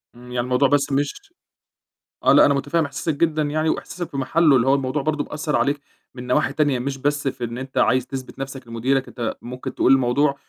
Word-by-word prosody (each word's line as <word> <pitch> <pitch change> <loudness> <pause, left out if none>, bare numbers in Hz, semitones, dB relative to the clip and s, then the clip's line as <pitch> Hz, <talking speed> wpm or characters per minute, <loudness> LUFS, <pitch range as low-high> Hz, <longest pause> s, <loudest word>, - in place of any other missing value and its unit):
إمم، 125 +1 -14
يعني 125 - -2
الموضوع 125 +2 +3
بس 145 -1 +2
مش 145 - -2 0.9
آه، - - +5
لأ، - - +7
أنا 140 - +4
مُتفهِّم 155 +3 0
إحساسك 145 +3 -3
جدًا 155 -1 +1
يعني 155 +2 0
وإحساسك 175 +1 -4
في 140 - -6
مَحلُّه، 150 +2 +3
اللي 125 +1 +2
هو 135 - +5
الموضوع 135 +1 -1
برضه 150 0 -1
بيأثّر 150 0 -3
عليك 145 0 +1 0.3
من 125 0 -8
نواحي 130 +2 +1
تانية، 145 -5 +1
مش 135 +2 -3
بس 145 +1 -1
في 125 - -3
إن 120 +1 -4
أنت 130 0 -7
عايز 130 -1 +3
تثبت 135 0 -7
نَفْسك 135 -2 -6
لمُديرك، 130 +4 0
أنت 120 -3 -4
ممكن 125 +1 -7
تقول 130 - +3
الموضوع 135 +3 +2
135 Hz, 210 wpm, -22 LUFS, 130-145 Hz, 0.9 s, لأ